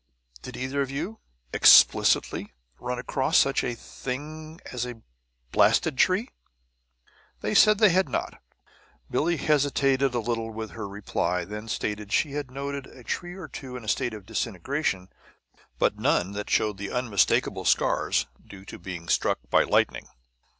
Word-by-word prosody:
Did - - -8
either 130 +2 -2
of 135 - -2
you," 165 +11 -5 0.3
explicitly, - - +5 0.2
"run 125 0 -3
across 130 +2 0
such 135 - +3
a 120 - -2
thing 155 +7 -7
as 125 -2 -3
a 120 -3 -7 0.5
blasted 155 - +3
tree?" 195 +8 +3 1.1
They - - -2
said 215 -1 +6
they 215 -1 +6
had 185 -3 +2
not. 120 - -4 0.7
Billie 170 +2 +1
hesitated 140 -3 +2
a - - +1
little 115 0 -2
with 110 -1 -6
her 110 -3 -6
reply, 90 -3 -2
then 105 +3 -7
stated 105 -1 -3
that 100 - -7
she 150 - +2
had 145 -2 -4
noted 140 +1 -5
a 125 - -15
tree 175 +7 -4
or 185 -5 -8
two 130 -2 -8
in 120 - -10
a - - -11
state 110 +1 0
of 105 -3 -11
disintegration, 105 - -2 0.7
but - - +1
none 90 +2 +1
that 105 +1 -5
showed 105 -3 +1
the 100 - -4
unmistakable 115 -5 +1
scars - - +2 0.2
due 95 -1 -13
to - - -10
being 85 -3 -7
struck - - +2
by - - +5
lightning. - - +1
125 Hz, 155 wpm, -26 LUFS, 105-145 Hz, 1.1 s, said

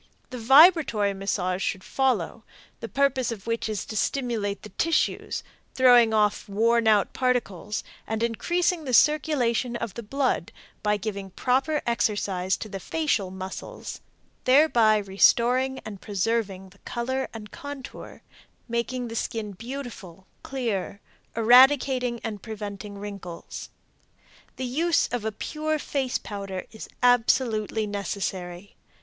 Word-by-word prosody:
The 250 - -5
vibratory 270 - +6
massage 190 -1 -2
should 190 0 -2
follow, 235 -6 0 0.4
the 230 - -5
purpose 270 -1 +1
of 210 -4 -7
which 230 -1 -2
is 210 -3 -3
to 220 - -7
stimulate 215 -3 -1
the 210 - -9
tissues, 325 - 0 0.3
throwing 245 -3 +6
off 210 -1 +1
worn 230 +3 +2
out 210 -2 +3
particles 225 -6 -1 0.2
and 220 +1 -2
increasing 345 +9 0
the 255 -3 +2
circulation 260 -6 +2
of 230 -4 -4
the 235 - -6
blood 270 +5 -1 0.3
by 210 0 +1
giving 200 -1 -5
proper 265 - 0
exercise 200 -5 0
to - - -6
the 195 -2 -6
facial 255 - -1
muscles, 190 0 -7 0.4
thereby 255 -6 +5
restoring 240 +6 +3
and 205 -3 -8
preserving 200 -2 -2
the 195 +2 -22
color 260 +2 -3
and 210 -2 -9
contour, 285 -2 -9 0.4
making 240 +1 -2
the 230 - -7
skin 220 -2 -3
beautiful, 225 -5 -8 0.2
clear, 225 -7 -3 0.4
eradicating 250 +1 +5
and 210 -4 -5
preventing 205 -2 -7
wrinkles. 200 -4 -8 0.9
The 260 - -4
use 320 +6 +1
of 235 -2 -3
a 220 - 0
pure 310 +8 -2
face 270 -3 -1
powder 195 -3 -6
is 220 - -9
absolutely 225 -3 +2
necessary. 195 -2 -4
230 Hz, 125 wpm, -26 LUFS, 200-255 Hz, 0.9 s, vibratory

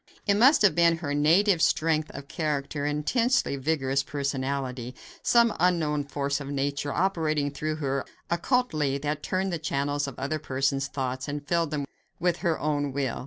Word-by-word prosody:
It 205 - +3
must 245 +6 +5
have 205 - +6
been 170 -1 +4
her 150 -3 -3
native 165 +5 +4
strength 155 -2 +2
of 140 0 -8
character 145 -2 -2
and 145 0 0
intensely 240 - +1
vigorous 140 -1 0
personality; 135 -3 -3 0.3
some 235 -2 +4
unknown 160 -5 +1
force 140 0 -2
of 140 - -6
nature, 140 +1 -2
operating 155 -5 0
through 155 +2 -3
her 140 -3 -2 0.2
occultly, 170 - 0
that 145 +1 -3
turned 185 0 -1
the 170 - -2
channels 145 -1 -1
of 135 - -8
other 140 +4 -2
persons' 135 -1 -1
thoughts 130 -1 -3
and 145 0 -5
filled 170 0 +1
them 145 -2 -2 0.3
with 175 -1 +1
her 170 -4 0
own 145 -2 -1
will. 135 -2 -2
145 Hz, 165 wpm, -27 LUFS, 140-165 Hz, 0.3 s, have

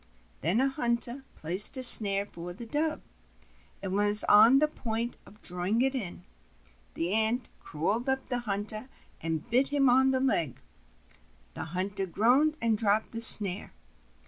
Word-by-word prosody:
Then 180 +8 -2
a 265 - 0
hunter 245 -1 -1
placed 185 - +3
a 260 - +1
snare 200 -4 +6
for 175 -2 -12
the 235 +6 -12
Dove, 300 +6 -5 0.8
and 190 -1 -6
was 205 +1 +4
on 220 +5 +4
the 305 +2 0
point 235 -4 -7
of 210 - -21
drawing 180 +7 +4
it 270 0 -2
in. 190 -9 -8 0.7
The 170 +3 -5
Ant 220 +3 -1
crawled 205 - -5
up 265 0 -3
to - - -24
the 245 -2 -4
hunter 215 +2 -5 0.3
and 160 +4 -6
bit 250 +3 -1
him 275 -3 0
on 265 +2 +1
the 260 -1 -2
leg; 170 - -3 0.9
the - - -8
hunter 190 +4 -6
groaned 255 - -1
and 225 -2 -2
dropped 215 0 -2
the 230 - -6
snare. 200 -5 +5
220 Hz, 160 wpm, -26 LUFS, 195-255 Hz, 0.9 s, snare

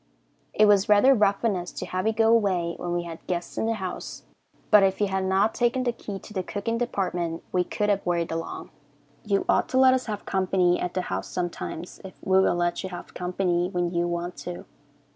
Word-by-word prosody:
It 215 - +6
was 205 -1 +4
rather 210 +6 +6
rough 205 -2 +2
on 215 -4 +2
us 175 -1 -5
to - - -5
have 185 +3 -2
you 220 - +2
go 225 0 +3
away 185 -6 +1
when 175 - -4
we 175 0 -1
had 165 -1 -9
guests 175 -1 -3
in 220 - -1
the 225 - +1
house, 190 -4 -6 0.5
but 210 -1 +8
if 195 -1 +2
you 210 - +3
had 190 -1 -1
not 195 +3 +2
taken 240 +1 +1
the 245 - +1
key 210 -4 -7
to 210 - -12
the 190 - -1
cooking 210 +5 -3
department 180 -8 -2
we 180 - +2
could 210 +3 -2
have 200 -1 +1
worried 170 -1 -1
along. 165 0 -5 0.5
You 200 -2 0
ought - - +2
to 260 - 0
let 260 0 +7
us 255 -1 -1
have 210 -2 -4
company 185 -2 +2
at 175 - -3
the 185 - +1
house - - -4
sometimes 175 -1 -5
if 190 - -10
we 190 0 +4
will 185 - +2
let 175 0 0
you 190 - -5
have 175 -1 -9
company 180 -1 -1
when 175 -2 -1
you 170 0 +1
want 175 +1 -3
to. 175 0 -7
190 Hz, 225 wpm, -26 LUFS, 175-210 Hz, 0.5 s, but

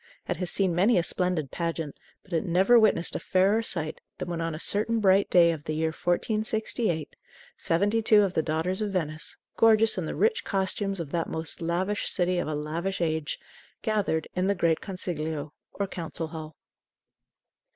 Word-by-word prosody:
It - - -1
has 180 -2 -2
seen 190 -3 +2
many 195 +7 +3
a 175 - +3
splendid 180 -6 0
pageant, 165 -3 -3 0.3
but 190 - -12
it 165 - +1
never 190 +7 +5
witnessed 210 -6 +2
a - - -1
fairer 195 +4 +2
sight 160 -8 -1 0.2
than - - -5
when 170 -1 -3
on 165 -1 -2
a - - -7
certain 215 +5 +1
bright 195 -1 +4
day 170 -2 +6
of 155 -3 -6
the 155 - -2
year 160 +1 +1
1468 215 - -1 0.4
seventy 205 +7 +1
two 215 -1 +5
of 190 -2 -1
the 160 - +2
daughters 160 +5 -1
of 210 - -1
Venice, 155 -4 -3 0.2
gorgeous 225 -2 +5
in 165 - -3
the - - -4
rich 220 +3 +2
costumes 195 0 -1
of 155 -4 -5
that 170 -1 -1
most 160 +1 -4
lavish 185 +5 -1
city 180 -1 +1
of - - -2
a 155 - -2
lavish 165 +6 -3
age, 160 -3 -1 0.5
gathered 205 -8 0
in 185 +1 0
the 200 - +2
great 165 -3 +1
Consiglio, 155 -6 -4 0.2
or 200 - -2
Council 165 -3 -5
Hall. 155 -1 -8
175 Hz, 180 wpm, -27 LUFS, 160-200 Hz, 0.5 s, day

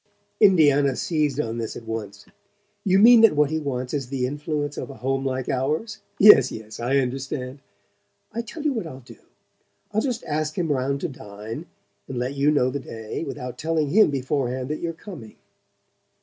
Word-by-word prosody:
Indiana 145 -9 +5
seized 150 -4 0
on 115 -4 -2
this 115 -1 -4
at 115 - -9
once. 105 -3 -6 0.6
"You 190 -1 +3
mean 230 +3 +8
that 225 -8 +6
what 150 0 +3
he 160 - 0
wants 130 -4 -4
is 140 -4 -2
the 130 -1 -2
influence 145 +1 -3
of - - -6
a 135 - -9
home 135 +1 -2
like 130 -1 -2
ours? 155 - -1 0.2
Yes, 135 - +8
yes, 110 -1 -9
I 125 +4 +1
understand. 130 0 -3 0.7
I 230 - -2
tell 285 +7 -8
you 300 -2 +1
what 220 -9 -3
I'll 135 -4 -9
do: 120 - -15 0.7
I'll 215 +1 +1
just 245 -2 -2
ask 155 +1 -2
him 170 -4 0
round 140 +1 -1
to - - -1
dine, 110 +2 -8 0.4
and 130 - -5
let 125 +3 -2
you 140 +1 +2
know 135 -4 +2
the 140 - -3
day, 110 0 -6
without 125 -3 -6
telling 160 -2 0
him 215 +4 +5
beforehand 130 -2 -2
that 150 - -3
you're 170 - -2
coming." 165 - -11
140 Hz, 185 wpm, -24 LUFS, 125-160 Hz, 0.7 s, mean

